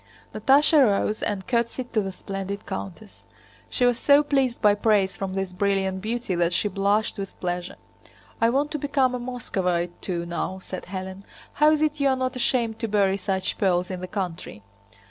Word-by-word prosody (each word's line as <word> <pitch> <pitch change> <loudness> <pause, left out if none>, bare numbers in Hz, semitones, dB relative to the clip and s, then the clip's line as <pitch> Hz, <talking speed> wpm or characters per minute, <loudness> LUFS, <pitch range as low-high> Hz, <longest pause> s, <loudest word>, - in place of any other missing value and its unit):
Natásha 290 +2 +5
rose 210 -1 +1
and 200 -2 -2
curtsied 240 0 -1
to 220 - +3
the 195 -1 -4
splendid 195 +1 -6
countess. 195 +1 -7 0.5
She 250 - +1
was 245 -1 +2
so 285 +3 +5
pleased 270 -4 +1
by 210 -1 +5
praise 205 -2 +2
from 190 -1 -4
this 190 -1 -3
brilliant 190 0 0
beauty 230 -1 -2
that 175 0 +1
she 210 - +1
blushed 205 +2 0
with 195 -1 -7
pleasure. 175 0 -3 0.7
"I 230 - +5
want 280 +5 0
to 300 - -2
become 275 -2 +1
a 250 - -2
Moscovite 185 -8 -2
too, 170 -2 -3
now," 175 +2 -3
said 185 0 -7
Hélène. 190 0 -6 0.3
"How 300 +1 +5
is 310 0 +2
it 300 -1 0
you're 275 -2 +3
not 255 0 -2
ashamed 235 -3 0
to 225 - -2
bury 200 -2 +2
such 190 -1 -2
pearls 180 -2 +1
in 180 -1 -5
the 185 - -5
country?" 180 - -5
205 Hz, 185 wpm, -25 LUFS, 190-250 Hz, 0.7 s, Natásha